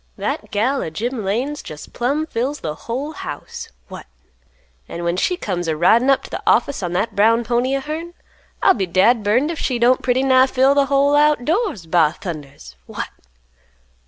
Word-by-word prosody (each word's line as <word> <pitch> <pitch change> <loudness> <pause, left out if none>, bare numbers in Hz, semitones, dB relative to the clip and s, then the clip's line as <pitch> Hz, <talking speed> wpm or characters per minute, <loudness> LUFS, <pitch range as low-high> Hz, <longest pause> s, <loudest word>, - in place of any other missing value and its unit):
That - - -3
gal 255 +7 0
o' - - -3
Jim 230 +8 -4
Lane's 250 +10 -2
jest 150 -1 -10
plumb 280 +6 -1
fills 275 +1 -3
th' - - -9
whole 255 - -5
house. 315 - -8 0.2
What! - - -10 0.8
An' 170 - -6
when 170 0 0
she 360 - 0
comes 175 - -3
a 160 -1 -1
ridin' 230 - +4
up 270 - +3
t' - - -12
th' - - -5
office 280 - +2
on 175 -2 -3
that 205 +4 -1
brown 225 +3 +3
pony 245 +4 0
o' - - -4
hern, 325 +4 -6 0.5
I'll - - +6
be 195 -5 -2
dad 215 +7 +3
burned 245 +10 +2
if 330 - -6
she 255 - -1
don't 245 +2 +3
pretty 255 +1 +1
nigh 260 -1 +5
fill 265 +1 +3
th' 280 -1 +2
whole 280 +1 +3
out 295 -3 +3
doors, 330 - -1
ba 160 -1 +2
thundas! 145 - -8
What!" - - -5
245 Hz, 190 wpm, -20 LUFS, 190-280 Hz, 0.8 s, I'll